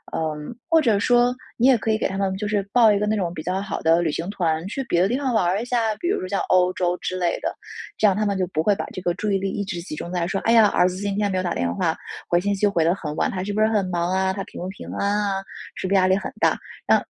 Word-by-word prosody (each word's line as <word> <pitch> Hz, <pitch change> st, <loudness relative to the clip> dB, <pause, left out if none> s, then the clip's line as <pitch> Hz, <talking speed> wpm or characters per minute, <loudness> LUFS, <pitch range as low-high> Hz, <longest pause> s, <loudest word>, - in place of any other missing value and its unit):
嗯， 155 Hz, +6 st, -3 dB
或 325 Hz, 0 st, +5 dB
者 225 Hz, -8 st, +2 dB
说 245 Hz, +3 st, +3 dB, 0.2 s
你 240 Hz, -, +2 dB
也 260 Hz, -2 st, +6 dB
可 220 Hz, -, -3 dB
以 215 Hz, -, +2 dB
给 -, -, -2 dB
他 190 Hz, -, -5 dB
们 195 Hz, -1 st, 0 dB
就 210 Hz, +1 st, -3 dB
是 205 Hz, -1 st, +1 dB
报 230 Hz, -3 st, +6 dB
一 205 Hz, -, +2 dB
个 210 Hz, -, 0 dB
那 215 Hz, -, +1 dB
种 180 Hz, -5 st, -2 dB
比 155 Hz, -, -6 dB
较 185 Hz, +3 st, -1 dB
好 200 Hz, -, -4 dB
的 165 Hz, +1 st, +4 dB
旅 165 Hz, -3 st, 0 dB
行 165 Hz, +4 st, -4 dB
团 165 Hz, -5 st, -1 dB
去 270 Hz, +7 st, -3 dB
别 175 Hz, -8 st, +1 dB
的 185 Hz, -, +4 dB
地 245 Hz, +5 st, 0 dB
方 270 Hz, -3 st, -1 dB
玩 220 Hz, -5 st, +2 dB
儿 185 Hz, +4 st, +1 dB
一 -, -, -4 dB
下， 230 Hz, -3 st, 0 dB
比 345 Hz, -, -2 dB
如 395 Hz, -, +1 dB
说 185 Hz, -, -5 dB
像 200 Hz, 0 st, 0 dB
欧 180 Hz, 0 st, +4 dB
洲 180 Hz, -1 st, 0 dB
之 185 Hz, -, -3 dB
类 175 Hz, -2 st, 0 dB
的。 -, -, -3 dB, 0.4 s
这 -, -, +2 dB
样 200 Hz, -, +4 dB
他 215 Hz, +2 st, 0 dB
们 200 Hz, -1 st, 0 dB
就 185 Hz, -, +1 dB
不 155 Hz, -3 st, -1 dB
会 205 Hz, +2 st, +3 dB
把 -, -, -4 dB
这 185 Hz, -, -7 dB
个 175 Hz, -1 st, 0 dB
注 205 Hz, +3 st, -2 dB
意 195 Hz, -, +3 dB
力 195 Hz, 0 st, -2 dB
一 200 Hz, -, -2 dB
直 175 Hz, -3 st, -4 dB
集 170 Hz, -, -7 dB
中 170 Hz, +3 st, -6 dB
在 175 Hz, -2 st, -1 dB
说： 195 Hz, +1 st, -2 dB
“哎 230 Hz, -, +2 dB
呀， 225 Hz, -2 st, +7 dB
儿 180 Hz, -2 st, +3 dB
子 180 Hz, -, -6 dB
今 200 Hz, 0 st, -2 dB
天 205 Hz, -1 st, +1 dB
没 185 Hz, -, -1 dB
有 185 Hz, -, 0 dB
打 175 Hz, -, -1 dB
电 85 Hz, 0 st, -1 dB
话， -, -, 0 dB, 0.3 s
回 175 Hz, 0 st, +2 dB
信 205 Hz, +2 st, 0 dB
息 205 Hz, +2 st, +2 dB
回 175 Hz, -5 st, +1 dB
得 165 Hz, +2 st, +3 dB
很 150 Hz, -6 st, -5 dB
晚， -, -, 0 dB
他 185 Hz, -, -3 dB
是 205 Hz, +1 st, -3 dB
不 215 Hz, -, 0 dB
是 215 Hz, -, +5 dB
很 210 Hz, -3 st, +1 dB
忙 175 Hz, 0 st, -1 dB
啊， 190 Hz, 0 st, +1 dB
他 195 Hz, 0 st, -4 dB
平 -, -, -10 dB
不 180 Hz, -, -4 dB
平 195 Hz, -, -9 dB
安 205 Hz, +1 st, 0 dB
啊， 195 Hz, 0 st, -2 dB, 0.3 s
是 -, -, -4 dB
不 195 Hz, -, 0 dB
是 -, -, +4 dB
压 185 Hz, -1 st, +4 dB
力 190 Hz, +1 st, +3 dB
很 -, -, -4 dB
大。” -, -, +3 dB, 0.3 s
让 -, -, +5 dB
195 Hz, 355 characters per minute, -23 LUFS, 175-210 Hz, 0.4 s, 呀